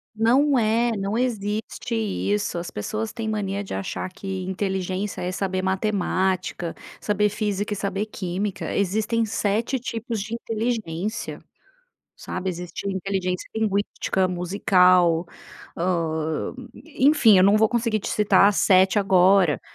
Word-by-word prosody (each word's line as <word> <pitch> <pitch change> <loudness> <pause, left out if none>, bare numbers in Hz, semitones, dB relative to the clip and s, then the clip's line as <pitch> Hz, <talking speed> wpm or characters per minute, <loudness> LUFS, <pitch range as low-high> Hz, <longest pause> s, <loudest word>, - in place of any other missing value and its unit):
Não 255 +5 +3
é, 230 +2 +2
não 200 +2 -2
existe 220 -1 -2
isso, 205 -3 -1
as 170 - -6
pessoas 215 - -4
têm 225 -2 -5
mania 205 -2 -2
de 195 - -7
achar 95 - -4
que 190 -1 -5
inteligência 190 +1 -3
é 180 +1 -2
saber 185 -1 -2
matemática, 190 -3 -1 0.3
saber 210 0 +1
física 205 0 -2
e - - -3
saber 200 +1 -2
química, 195 -1 -4
existem 215 +4 0
7 220 +5 -1
tipos 230 -2 -4
de 220 +3 -4
inteligência, 220 -4 -3 0.8
sabe? 190 - -4
Existe 180 +2 -6
inteligência 190 -1 -2
linguística, 200 -3 0
musical, 180 -2 +3 0.5
hã, 160 -1 -1 0.4
enfim 260 -7 +5
eu 185 - +6
não 200 +2 +5
vou 215 0 +4
conseguir 230 -2 0
te - - -5
citar 205 -1 +4
7 190 0 +4
agora. 190 -4 +4
200 Hz, 125 wpm, -24 LUFS, 185-220 Hz, 0.8 s, eu